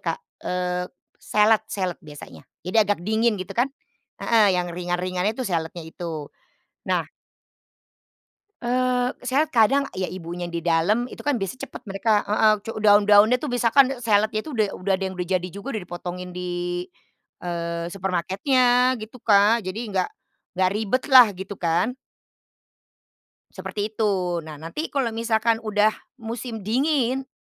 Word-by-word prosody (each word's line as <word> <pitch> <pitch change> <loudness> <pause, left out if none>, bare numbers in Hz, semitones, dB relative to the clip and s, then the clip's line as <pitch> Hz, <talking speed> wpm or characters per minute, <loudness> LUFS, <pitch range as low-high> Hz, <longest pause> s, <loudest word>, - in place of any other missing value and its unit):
Kak, - - -2 0.2
eee, 180 0 -2 0.3
salad 215 +1 +3
salad 185 -3 -3
biasanya. 150 -1 -12 0.2
Jadi 185 +5 -2
agak 205 -2 +2
dingin 220 +1 +2
gitu 185 -1 -6
kan, 245 +3 +1 0.5
heeh, 210 -5 +4
yang 175 -1 -2
ringan-ringannya 180 +3 -2
itu 255 - -3
saladnya 170 -3 -3
itu. 160 -2 -7 0.6
Nah - - 0 1.5
eee, 250 0 +1 0.2
saya 285 +5 +1
kadang 270 +4 +3
ya 185 0 -3
ibunya 175 -1 -6
di 170 -1 -4
dalam 175 +9 +1
itu - - -11
kan 290 - +2
biasanya 245 +5 -3
cepet - - -11
mereka 205 +2 +2
heeh, 215 +1 +4
cu 225 0 -7
daun-daunnya 210 +3 +5
tuh 300 - -3
misalkan 245 +2 +4
saladnya 215 -2 +1
itu 305 - -7
udah 215 -3 0
udah 190 +1 0
ada 190 +1 -1
yang 185 - -9
udah 180 0 -4
jadi 180 0 0
juga 200 +9 -7
udah 215 - -3
dipotongin 180 +1 -6
di, 175 0 -3 0.6
eee, 170 -1 -3
supermarketnya 245 - +2
gitu, 220 +3 -9
Kak. 210 -1 +4
Jadi 185 +4 -4
nggak 185 -2 0 0.4
nggak 185 0 +2
ribetlah, 255 +4 +6
gitu 190 +2 -8
kan. 175 +9 0 1.6
Seperti 210 +1 -4
itu. 190 -5 0
Nah, 155 -1 -9
nanti 165 - -5
kalau 265 -5 -1
misalkan 225 0 +1
udah 215 -1 +2 0.3
musim 230 -1 -5
dingin. 265 +2 0
205 Hz, 140 wpm, -24 LUFS, 180-235 Hz, 1.6 s, ribetlah